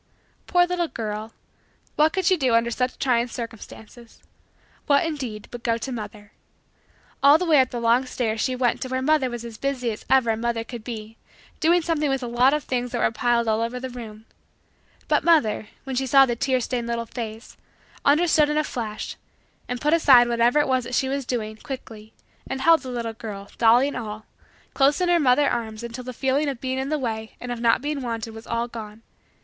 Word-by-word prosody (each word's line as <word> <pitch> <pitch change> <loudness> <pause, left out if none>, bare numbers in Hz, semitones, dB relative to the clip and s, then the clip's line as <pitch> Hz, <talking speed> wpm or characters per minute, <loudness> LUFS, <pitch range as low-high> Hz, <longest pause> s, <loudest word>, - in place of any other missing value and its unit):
Poor 355 0 +4
little 355 -1 -1
girl! 215 -3 -5 0.6
What 310 +1 +4
could 380 0 -2
she 375 +1 +5
do 260 -8 +1
under 235 +1 +2
such 250 +2 -1
trying 245 -2 +1
circumstances 230 0 -10 0.6
what 285 +3 +4
indeed 255 -10 -5
but 240 - -7
go 230 -1 0
to 260 +3 -5
mother. 210 -3 -7 0.9
All 285 +2 +7
the 360 - -2
way 310 -4 +5
up 255 - 0
the 240 - -4
long 235 +3 +2
stairs 225 -3 -2
she 255 - 0
went 250 -1 0
to - - -3
where 260 0 -2
mother 300 -2 +2
was 240 -1 -6
as 225 -2 -9
busy 260 -4 -1
as 215 - -8
ever 260 -4 +4
a - - 0
mother 235 0 -1
could 235 -1 -9
be 225 -2 -7 0.4
doing 340 +1 +3
something 310 -3 0
with 270 -1 -1
a - - -3
lot 245 +3 +3
of 300 -1 0
things 245 -1 -2
that 245 - -2
were - - +2
piled 235 0 +1
all 220 0 +1
over 235 +2 -2
the 260 0 -6
room. 220 -3 -9 0.8
But - - +2
mother, 295 -11 +3 0.2
when 270 -1 -5
she 265 +1 -1
saw 270 +1 +7
the 240 -2 -2
tear 255 +1 0
stained 240 -1 -3
little 235 0 -2
face, 225 -1 -7 0.5
understood 305 0 +4
in 300 - 0
a 305 - +2
flash 215 -6 -5 0.5
and 250 0 -3
put 300 +4 +1
aside 265 -7 +6
whatever 235 +3 +2
it 295 - +3
was 260 -1 +1
that 250 - -3
she 265 - +1
was 275 -2 -3
doing, 215 -3 -3
quickly, 220 -4 -9 0.4
and 265 0 -4
held 330 +3 +5
the 260 - -7
little 235 -2 -4
girl, 205 -3 -8
dolly 240 +4 +5
and 285 - -5
all, 215 -2 -6 0.5
close 280 +3 +3
in 360 -1 +1
her 345 -1 +4
mother 280 0 +4
arms 220 -2 -3
until 235 +2 -6
the 255 - -6
feeling 270 +4 0
of 265 -4 -5
being 260 +1 -2
in 265 +1 -3
the 305 - 0
way 220 -4 -4
and 245 - -6
of 240 - -4
not 235 +2 +3
being 295 -1 -2
wanted 230 -2 -4
was 225 +1 -11
all 235 +1 -1
gone. 220 -1 -9
245 Hz, 215 wpm, -24 LUFS, 230-275 Hz, 0.9 s, All